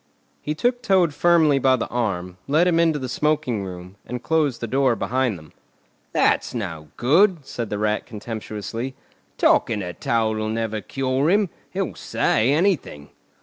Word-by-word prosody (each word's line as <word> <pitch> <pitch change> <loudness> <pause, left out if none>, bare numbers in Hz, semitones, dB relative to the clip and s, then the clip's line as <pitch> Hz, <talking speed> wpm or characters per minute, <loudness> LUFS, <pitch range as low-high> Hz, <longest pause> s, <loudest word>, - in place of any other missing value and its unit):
He 150 - -3
took 245 +8 0
Toad 185 -8 +3
firmly 155 -3 +4
by 130 0 +4
the 115 - -3
arm, 90 -7 -2
led 155 +5 +3
him 170 -2 +3
into 165 -2 +3
the 130 -3 -4
smoking 145 -5 0
room, 90 +1 -9
and 125 0 -6
closed 150 -6 +1
the - - -3
door 130 +1 +2
behind 125 -1 0
them. 75 -2 -16 0.6
"That's - - +1
no 80 -9 -5
good!" 165 - +3
said 120 -4 -5
the 105 - -2
Rat 105 +1 -1
contemptuously. 115 +2 -6 0.4
"Talking 105 -2 +3
to 90 -2 -5
Toad'll 110 0 0
never 110 -1 -2
cure 135 +4 0
him. 200 -1 +2 0.2
He'll - - -3
say 115 +5 +1
anything." 155 - 0
125 Hz, 155 wpm, -23 LUFS, 110-155 Hz, 0.6 s, firmly